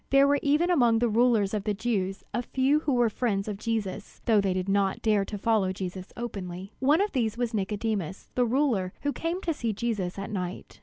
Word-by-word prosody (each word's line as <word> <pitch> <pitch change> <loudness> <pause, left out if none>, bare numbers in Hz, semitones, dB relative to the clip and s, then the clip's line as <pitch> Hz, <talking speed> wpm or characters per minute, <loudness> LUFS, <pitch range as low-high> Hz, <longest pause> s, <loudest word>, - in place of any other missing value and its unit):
There 275 +1 +6
were 285 0 +3
even 300 +5 +2
among 240 -9 +4
the 240 +1 +2
rulers 225 -3 +3
of 210 -2 -1
the 210 0 -1
Jews 195 -3 -2
a 240 - 0
few 265 +4 +2
who 300 -3 -1
were 240 -1 +4
friends 210 -3 -1
of 205 -2 -4
Jesus, 210 -4 -3
though 220 -4 +4
they 195 -1 0
did 185 0 -2
not 195 -1 +1
dare 210 -3 +3
to 205 - -5
follow 205 -3 +2
Jesus 185 0 -6
openly. 195 -4 -6
One 290 +7 +4
of 410 - 0
these 230 -4 0
was 240 -1 -1
Nicodemus, 205 -2 -2
the 250 - +2
ruler 235 -7 +1
who 285 0 0
came 335 +3 -2
to 335 - 0
see 230 -6 -2
Jesus 205 -5 -2
at 195 +1 -5
night. 180 -3 -5
220 Hz, 215 wpm, -27 LUFS, 195-250 Hz, -, There